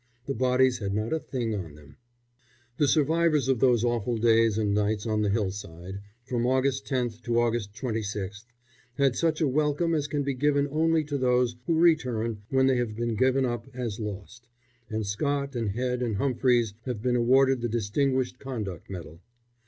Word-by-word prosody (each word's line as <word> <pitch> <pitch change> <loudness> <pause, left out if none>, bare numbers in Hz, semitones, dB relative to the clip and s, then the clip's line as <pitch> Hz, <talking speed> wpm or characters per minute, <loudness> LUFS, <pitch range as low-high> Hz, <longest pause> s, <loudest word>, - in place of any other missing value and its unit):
The 135 - -2
bodies 130 +1 +2
had 100 -2 -2
not 110 +6 -1
a 160 - +1
thing 120 -7 -3
on 85 -8 -5
them. 75 -1 -16 0.8
The 145 - +3
survivors 155 -1 +2
of 130 -3 +2
those 120 -3 +3
awful 120 -1 0
days 115 -1 +3
and 105 -2 +1
nights 105 +1 0
on 110 -1 0
the 105 - +1
hillside 95 -2 -4 0.2
from 120 0 -1
August 130 +1 +1
10th 120 -4 -2
to 120 0 +2
August 115 -3 -1
26th 105 -4 -4 0.5
had 135 -3 +2
such 165 -1 0
a 155 - +3
welcome 150 +4 +1
as 150 -2 0
can 145 -1 -1
be 140 0 -1
given 145 +2 +1
only 160 +1 +2
to 145 -1 -3
those 125 -1 +2
who 165 - +2
return 125 -10 +2
when 130 0 +3
they 130 -1 +3
have 120 -3 -2
been 120 0 -2
given 130 +3 +2
up 120 -1 -3
as 120 -4 -4
lost, 105 +3 -7 0.4
and 110 -1 -2
Scott 140 +6 -2
and 115 -3 -1
Head 125 +4 -2
and 115 -4 -1
Humphries 120 -2 +1
have 120 -5 -4
been 125 -1 +1
awarded 130 +2 +4
the 120 - -1
Distinguished 125 +4 0
Conduct 110 - -6
Medal. 85 -3 -8
120 Hz, 180 wpm, -27 LUFS, 110-135 Hz, 0.8 s, awarded